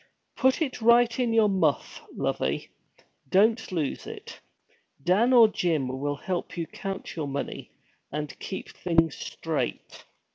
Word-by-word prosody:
'Put 260 +4 +3
it 260 -5 -5
right 235 +1 +5
in 245 -2 +1
your 225 -2 +5
muff, 175 -7 0
lovey. - - -2 0.6
Don't 220 - +3
lose 160 -6 -2
it. - - -9 0.6
Dan 205 - +3
or 235 -3 +8
Jim 165 -9 0
will 145 +1 -1
help 175 +4 -4
you 170 - -1
count 195 +3 -6
your 155 -4 -3
money, 140 0 -5 0.4
and 150 0 -5
keep 190 - -6
things 165 -3 +2
straight.' - - -4
190 Hz, 135 wpm, -27 LUFS, 160-230 Hz, 0.6 s, or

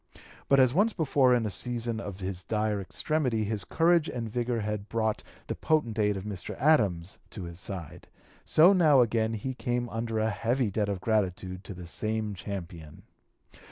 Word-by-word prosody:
But 140 - +5
as 130 -2 +5
once 205 +7 +3
before 135 -5 +3
in 120 -2 0
a 105 - -2
season 115 +2 -2
of 100 -3 -7
his 95 -1 -4
dire 105 -1 -1
extremity 120 - -1
his 105 -2 -2
courage 165 - +2
and 115 -2 -4
vigor 120 +1 -1
had 105 -1 -4
brought 110 -1 0 0.2
the - - -3
potent 120 -8 0
aid 105 -1 +2
of 95 - -6
Mr. 100 -3 -6
Adams 100 - +2
to 95 - -7
his 85 0 -8
side, 95 -6 -6 0.4
so 170 +5 +6
now 155 -8 +5
again 115 -1 +1
he 120 +5 -3
came 120 -1 -2
under 115 0 -3
a 110 +1 +1
heavy 115 +3 0
debt 105 0 0
of 100 -2 -3
(p. - - -16
239) 110 -1 +4 0.3
gratitude 90 +1 -10
to 100 - -8
the 90 0 -9
same 110 +4 -2
champion. 85 -3 -8
110 Hz, 190 wpm, -28 LUFS, 100-125 Hz, 0.4 s, so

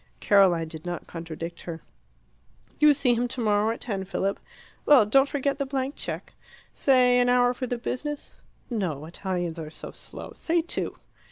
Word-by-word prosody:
Caroline 185 -5 +4
did 160 -1 -9
not 175 -1 -5
contradict 165 0 -7
her. 165 -2 -6 1.0
"You 300 -1 +7
see 265 -3 +3
him 240 +1 0
tomorrow 215 -3 +1
at 230 - -6
ten, 200 -5 -2
Philip. 195 +1 -2 0.4
Well, 280 -7 +7
don't 270 +6 +4
forget 280 0 -1
the 280 - 0
blank 270 0 -2
cheque. - - -5 0.4
Say 250 -2 +4
an 245 0 +3
hour 245 0 +4
for 255 +1 -4
the 245 - -2
business. 285 +5 -4 0.4
No, 170 - -2
Italians 175 -1 -3
are 155 -1 -6
so - - -8
slow; - - -9
say 335 0 0
two. 345 - -2
230 Hz, 165 wpm, -26 LUFS, 175-265 Hz, 1.0 s, You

